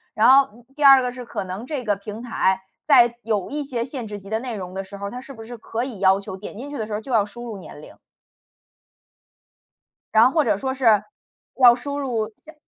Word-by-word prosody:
然 220 +4 +5
后， 275 +1 +6
嗯， 235 +1 -19
第 295 - -3
二 270 -1 +9
个 250 - -2
是 250 -1 -8
可 215 - -4
能 185 +5 -6
这 285 -5 -3
个 205 -1 +1
平 210 +3 -8
台 190 -5 0 0.2
在 240 -5 +5
有 210 -4 -1
一 295 +1 -3
些 245 -4 -3
限 255 -5 -6
制 205 -1 -7
级 195 +1 -13
的 220 - -1
内 245 -2 -5
容 185 -1 -7
的 195 0 -4
时 200 +1 -10
候 200 0 -5
儿， - - -7
它 250 +1 -7
是 275 +1 -11
不 225 -2 -10
是 240 +1 -9
可 225 +2 -4
以 230 -8 -8
要 190 0 +4
求 190 -1 -7
点 205 +1 -9
进 275 +4 -7
去 290 - -6
的 220 - -3
时 215 - -6
候 210 - -1
就 255 - -9
要 220 -3 +4
输 240 +4 -10
入 220 -4 -6
年 - - -11
龄。 - - -13 2.2
然 220 +1 +7
后 255 - +4
或 315 -2 +3
者 205 -3 +2
说 260 +3 -2
是， 225 -6 +3 0.6
要 240 -1 +9
输 285 +3 -5
入， 225 -5 -2
下 315 - -13
230 Hz, 270 characters per minute, -22 LUFS, 205-260 Hz, 2.2 s, 二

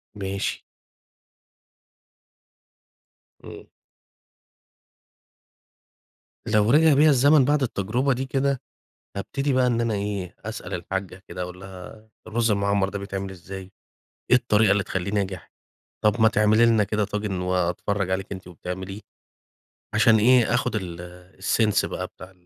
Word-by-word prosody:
ماشي. 100 -1 -3 2.8
إمم. - - -10 2.8
لو 105 +2 +3
رِجع 155 +1 +6
بيَّ 150 +3 +5
الزمن 140 0 +5
بَعد 145 -1 +2
التجربة 120 +5 0
دي 130 +2 -3
كده، 135 0 0 0.6
هابتدي 140 +7 -2
بقى 130 -1 +3
إن 120 -1 +1
أنا 115 -2 0
إيه، 100 -3 -4
أسأل - - -6
الحاجّة 95 0 -5
كده 90 +1 -5
أقول 90 +1 -7
لها 95 +3 -11 0.2
"الرز 115 +1 0
المعمّر 100 -1 +1
ده 100 - -5
بيتعمل 100 -1 -5
إزاي؟ 95 +1 -9 0.6
إيه 125 - +8
الطريقة 110 -4 +3
اللي 100 0 +2
تخلّيه 95 0 -3
ناجح؟ 95 -5 -3 0.5
طَب 105 +2 +3
ما 110 - +7
تعملي 110 0 +4
لنا 115 -2 +4
كده 105 +1 -1
طاجن 105 -2 -3
وأتفرّج 90 +2 -1
عليكِ 95 +1 -2
أنتِ 95 -2 -8
وبتعمليه." 95 +3 -7 0.9
عشان 110 +1 +5
إيه، 120 +1 +4
آخد 125 0 +1
ال 90 -1 -8
sense 105 +1 +2
بقى - - -4
بتاع 90 +1 -13
105 Hz, 125 wpm, -24 LUFS, 95-115 Hz, 2.8 s, إيه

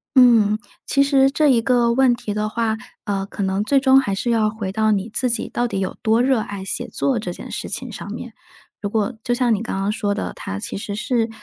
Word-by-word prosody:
嗯， 230 -5 +6 0.3
其 275 - +3
实 275 -1 +4
这 300 +2 +2
一 235 -3 +4
个 240 -1 +2
问 260 -1 +4
题 210 -3 -5
的 210 0 -1
话， 225 0 0 0.3
呃， 195 -1 -1
可 200 - -4
能 190 +1 0
最 275 +5 +3
终 265 0 +6
还 200 -7 -1
是 235 +5 -1
要 215 -2 +2
回 210 -3 -4
到 220 +1 +2
你 205 +1 0
自 255 - +1
己 235 - -1
到 240 0 -1
底 195 - -3
有 190 -1 -3
多 225 +1 +3
热 260 -2 +3
爱 200 -2 -5
写 - - -3
作 260 -5 0
这 180 -4 -4
件 - - -9
事 - - -4
情 - - -4
上 - - -7
面。 - - -7 0.5
如 205 - -2
果 215 +2 0
就 240 - 0
像 240 -2 +2
你 210 - -1
刚 230 - -3
刚 195 +1 0
说 205 -1 -1
的， 210 - -4
它 95 - -5
其 - - -5
实 200 0 -5
是， 230 +1 0
220 Hz, 265 characters per minute, -21 LUFS, 205-245 Hz, 0.5 s, 嗯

